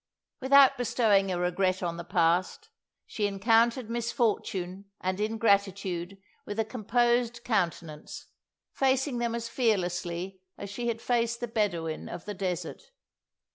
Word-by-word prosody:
Without 270 -1 +6
bestowing 210 -5 +2
a 180 - -1
regret 185 +1 0
on 170 -1 -2
the 170 - -5
past, 175 - +1 0.4
she 210 -2 -1
encountered 225 +4 +2
misfortune 215 -5 -1
and 185 +1 -2
ingratitude 200 -4 0 0.3
with 205 - -6
a 220 - +2
composed 240 +1 0
countenance, 170 -8 -2 0.5
facing 265 -1 +1
them 235 -1 -1
as 230 0 -4
fearlessly 185 -5 -1 0.2
as 200 - -7
she 240 +4 -4
had 230 -1 -2
faced 235 -1 0
the 240 - -3
Bedawun 175 -8 -2
of 170 - -7
the 210 - -4
desert. 185 - -4
205 Hz, 130 wpm, -28 LUFS, 185-235 Hz, 0.5 s, Without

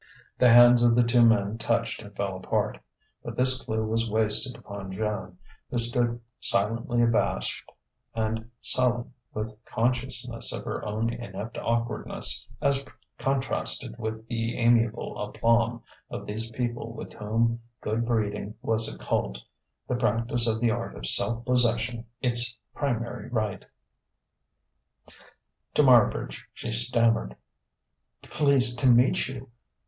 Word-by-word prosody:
The 125 - +6
hands 120 +1 +8
of 120 -1 +4
the 120 - +5
two 120 +1 +3
men 110 -1 +3
touched 115 0 -1
and 105 -2 -13
fell 100 -1 -2
apart. 95 - -2 0.4
But - - -6
this 130 +1 +3
clue 110 -2 -2
was 115 +1 0
wasted 110 +3 +2
upon 100 -2 -8
Joan, 95 -3 -4 0.3
who 125 - -3
stood 120 0 0 0.2
silently 115 +5 +1
abashed 115 -1 0 0.4
and 110 0 -2
sullen 120 -1 +2 0.2
with 110 +1 -5
consciousness 120 0 -2
of - - -5
her - - -4
own 110 +2 -2
inept 110 -1 -7
awkwardness 115 0 0 0.2
as 140 0 +2 0.4
contrasted 130 -3 0
with 110 0 -5
the 115 0 -2
amiable 115 -1 +1
aplomb 115 +2 +1 0.3
of - - -6
these 110 +2 -4
people 120 -1 -4
with - - -9
whom 115 +2 0 0.2
good 110 +2 -1
breeding 105 -3 -2
was 110 0 0
a - - -10
cult, - - -2 0.5
the - - -1
practice 120 -1 +1
of 110 -1 0
the 120 -2 +3
art 120 0 -4
of - - -7
self 115 - +4
possession 120 -2 +1 0.2
its 120 -1 0 0.2
primary 120 -4 -3
rite. 110 -5 -2 2.1
To 150 - +5
Marbridge 125 -5 +4
she 115 - -5
stammered: 115 - +1 0.9
"Pleased 130 -5 +2
to 130 - +4
meet 125 +2 +4
you." 130 -1 -8
115 Hz, 130 wpm, -27 LUFS, 110-120 Hz, 2.1 s, hands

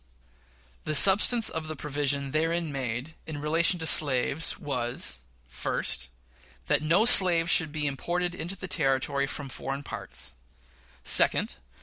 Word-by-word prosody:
The 155 - -2
substance 210 - +6
of 160 -1 -4
the 155 - -6
provision 140 -1 -3
therein 165 +1 -2
made 130 +2 -5
in 155 -2 -7
relation 165 +4 0
to 160 - -5
slaves 140 0 +2
was: 125 -4 -3 0.3
First. - - -4 0.6
That - - 0
no 170 +8 +1
slave 175 -7 +7
should 160 -3 +2
be 150 -1 -4
imported 175 +6 -3
into 180 +1 -7
the 185 0 -8
Territory 140 -4 -2
from 145 0 -8
foreign 135 +1 -7
parts. 65 - -6 0.7
Second. - - +3
150 Hz, 130 wpm, -26 LUFS, 140-170 Hz, 0.7 s, slave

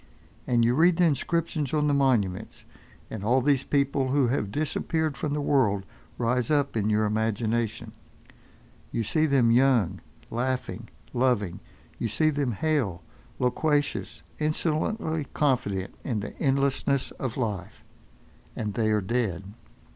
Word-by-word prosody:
And 120 -2 +3
you 120 - +3
read 165 +5 +4
the 180 - +4
inscriptions 155 -1 0
on 150 -1 +2
the 145 - +2
monuments, 120 -10 0 0.5
and 105 -3 -5
all 120 +5 +3
these 135 0 +2
people 140 -1 +1
who 130 -2 +2
have 105 -5 -1
disappeared 155 - -1
from 145 +2 -2
the 150 - -1
world 115 -9 +2 0.3
rise 120 0 0
up 145 -4 +1
in 110 -1 +1
your 110 0 +2
imagination. 110 +1 -1 1.0
You 115 - -1
see 155 +9 +1
them 130 -5 +4
young, 115 -7 +3 0.3
laughing, 130 +2 -2 0.2
loving; 120 -8 +1 0.4
you 115 - 0
see 135 +9 +2
them 140 -5 -1
hale, 110 - 0 0.3
loquacious, 145 +3 0 0.2
insolently 155 +1 -1
confident 120 -10 0
in 115 -6 -1
the 105 - -6
endlessness 140 0 +1
of 130 -3 -3
life. 105 -7 -4 0.7
And 105 -2 -3
they 110 -1 +1
are 105 -1 +2
dead. 100 -3 -2
125 Hz, 135 wpm, -27 LUFS, 110-145 Hz, 1.0 s, read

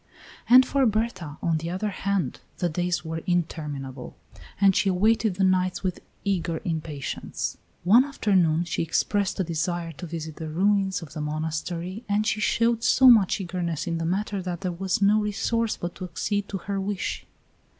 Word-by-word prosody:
And 255 +2 +9
for 275 -2 +2
Berta, 215 -9 -2
on 165 -2 +2
the 165 +2 -4
other 190 +4 -2
hand, 200 -1 -1 0.2
the 175 - 0
days 175 +1 -1
were 160 0 -4
interminable, 150 -7 -3 0.4
and 195 -2 +5
she 195 - +3
awaited 215 +2 +2
the 195 - 0
nights 185 0 +1
with 185 -2 -2 0.3
eager 175 -4 0
impatience. 155 -5 -4 0.2
One 220 +9 +6
afternoon 185 - +2
she 170 - -2
expressed 200 +5 0
a - - +3
desire 170 0 -2
to 170 +3 -8
visit 160 -2 -6
the 160 -1 -5
ruins 190 +2 +1
of 155 - -11
the 155 - -5
monastery, 160 +6 -3
and 205 +1 +2
she 215 0 0
showed 230 +1 +2
so 260 -1 +7
much 210 -3 +4
eagerness 175 -4 -3
in 165 -1 -2
the 165 - -2
matter 195 +3 -1
that 175 -2 -4
there 185 -2 -1
was 190 +3 -1
no 210 +2 +5
resource 215 +2 0
but 175 0 -4
to 185 - -6
accede 200 +4 -2
to 195 - -3
her 195 +1 -3
wish. 195 0 -3
185 Hz, 175 wpm, -25 LUFS, 165-205 Hz, 0.4 s, And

